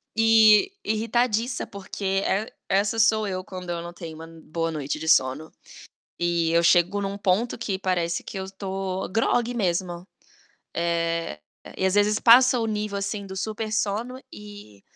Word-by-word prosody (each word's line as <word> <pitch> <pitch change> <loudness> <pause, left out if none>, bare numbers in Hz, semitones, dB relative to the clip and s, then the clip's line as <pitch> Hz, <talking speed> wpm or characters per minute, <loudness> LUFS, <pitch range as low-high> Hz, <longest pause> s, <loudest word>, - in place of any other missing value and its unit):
e 225 - +6
irritadiça, 230 +2 0
porque 200 0 -8 0.2
e 205 +3 -1 0.2
essa 205 +3 +1
sou 220 -1 +3
eu 185 -1 -3
quando 185 -2 -9
eu 170 -1 -3
não 170 0 -7
tenho 165 -2 -8
uma 165 0 -9
boa 165 0 -4
noite 150 0 -4
de 160 - -6
sono. 135 +4 +2 0.7
E 170 -1 +1
eu 170 0 +4
chego 175 +4 +3
num 195 0 -4
ponto 200 +6 0
que 200 -4 -3
parece 175 -3 -1
que 195 - -7
eu 190 0 -5
tô 190 -1 -4
grogue 230 +4 +1
mesmo, 180 -4 -2 0.7
eh, 170 - -1 0.4
e, 190 - -2
às 190 - +1
vezes, 210 +1 +3
passa 250 +2 +6
o 225 - 0
nível 210 -2 -2
assim 200 0 -4
do 190 - -8
super-sono 220 +3 -2
e 205 - -12
195 Hz, 155 wpm, -25 LUFS, 170-215 Hz, 0.7 s, e